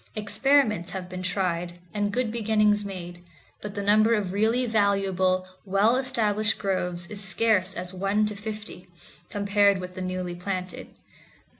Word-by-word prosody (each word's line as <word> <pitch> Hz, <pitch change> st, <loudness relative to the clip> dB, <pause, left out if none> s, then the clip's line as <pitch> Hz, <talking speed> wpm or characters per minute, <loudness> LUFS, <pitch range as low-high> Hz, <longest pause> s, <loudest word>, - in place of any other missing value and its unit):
Experiments 215 Hz, -2 st, +2 dB
have 185 Hz, -2 st, -5 dB
been 185 Hz, 0 st, -6 dB
tried, 180 Hz, -2 st, -1 dB, 0.2 s
and 205 Hz, -1 st, 0 dB
good 240 Hz, 0 st, 0 dB
beginnings 210 Hz, -2 st, +2 dB
made, 175 Hz, -3 st, -7 dB, 0.4 s
but 210 Hz, -1 st, -7 dB
the 200 Hz, -, -3 dB
number 215 Hz, +3 st, +4 dB
of 195 Hz, -4 st, -2 dB
really 225 Hz, +5 st, +2 dB
valuable, 195 Hz, -4 st, +1 dB, 0.2 s
well 200 Hz, +4 st, +3 dB
established 220 Hz, -5 st, +1 dB
groves 180 Hz, -3 st, -2 dB
is 205 Hz, -1 st, -2 dB
scarce 195 Hz, -1 st, +2 dB
as 180 Hz, +1 st, -5 dB
one 195 Hz, +3 st, +1 dB
to 210 Hz, 0 st, -2 dB
fifty, 210 Hz, -3 st, -7 dB, 0.4 s
compared 200 Hz, -1 st, +3 dB
with 180 Hz, 0 st, -7 dB
the 185 Hz, -, -7 dB
newly 185 Hz, -1 st, -3 dB
planted. 185 Hz, +1 st, -5 dB
200 Hz, 145 wpm, -26 LUFS, 185-215 Hz, 0.4 s, number